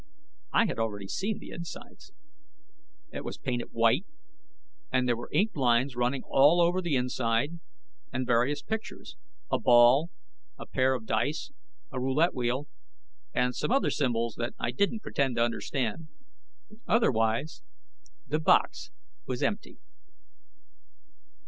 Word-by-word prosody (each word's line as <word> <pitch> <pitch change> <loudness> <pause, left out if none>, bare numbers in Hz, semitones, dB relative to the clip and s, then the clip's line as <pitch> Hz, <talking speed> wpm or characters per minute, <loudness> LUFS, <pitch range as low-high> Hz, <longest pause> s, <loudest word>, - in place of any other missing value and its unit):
I 230 - +4
had 180 - -3
already 105 -3 -2
seen 205 - -2
the - - -11
insides. 170 -1 -9 1.0
It - - -5
was - - -6
painted 120 -1 -3
white, 115 - +2 0.8
and 125 0 +2
there 120 - +2
were 120 - -8
inked 215 +1 +1
lines 125 -1 +2
running 125 +2 0
all 145 +6 +5
over 175 +2 +3
the 170 -5 0
inside, 125 +4 0 0.5
and 130 0 -2
various 125 +4 +1
pictures 220 0 -6 0.4
a - - +2
ball, 125 +6 +5 0.5
a - - -8
pair 130 0 +1
of 115 -3 -6
dice, 145 - -1 0.4
a 130 - -4
roulette 140 +7 +2
wheel 125 +3 -1 0.6
and 125 0 +1
some - - -2
other 270 +3 +2
symbols 115 -4 0
that 120 +1 -3
I 120 - -1
didn't 200 - 0
pretend 135 -3 0
to 115 - +3
understand. 120 +4 -2 0.8
Otherwise, 125 - +1 0.7
the 155 - 0
box 160 - +2 0.4
was 125 -1 -3
empty. 205 - -2
130 Hz, 130 wpm, -28 LUFS, 120-160 Hz, 1.0 s, all